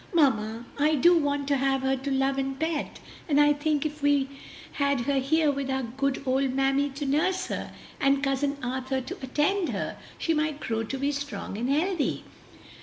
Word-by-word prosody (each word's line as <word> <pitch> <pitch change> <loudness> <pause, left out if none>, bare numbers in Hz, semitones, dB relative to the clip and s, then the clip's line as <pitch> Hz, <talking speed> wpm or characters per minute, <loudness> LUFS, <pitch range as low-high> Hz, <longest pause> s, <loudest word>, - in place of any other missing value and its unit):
"Mamma, 230 -6 +2
I 305 +2 +4
do 345 +5 +6
want 285 -3 0
to 280 - +3
have 270 0 +1
her 265 0 +2
to 270 +2 -4
love 270 0 +1
and 270 0 -3
pet, 320 -2 -2 0.3
and 290 -1 +4
I 295 0 +6
think 295 0 0
if 300 0 -4
we 285 -1 +3 0.4
had 280 -3 +1
her 275 +2 +1
here 300 +3 +2
with 275 -1 -3
our 265 0 0
good 270 +3 -2
old 265 0 +1
mammy 270 +1 +2
to 280 +2 -5
nurse 360 +7 +1
her, - - -4 0.3
and 275 0 +2
Cousin 280 +1 0
Arthur 260 +1 -2
to 255 - -7
attend 295 +8 +1
her, - - -3 0.2
she 330 - 0
might 305 -1 0
grow 225 -5 -2
to 225 +5 -4
be 280 +2 0
strong 285 -7 -5
and 240 +5 -2
healthy." 315 +2 0
275 Hz, 190 wpm, -27 LUFS, 265-295 Hz, 0.4 s, do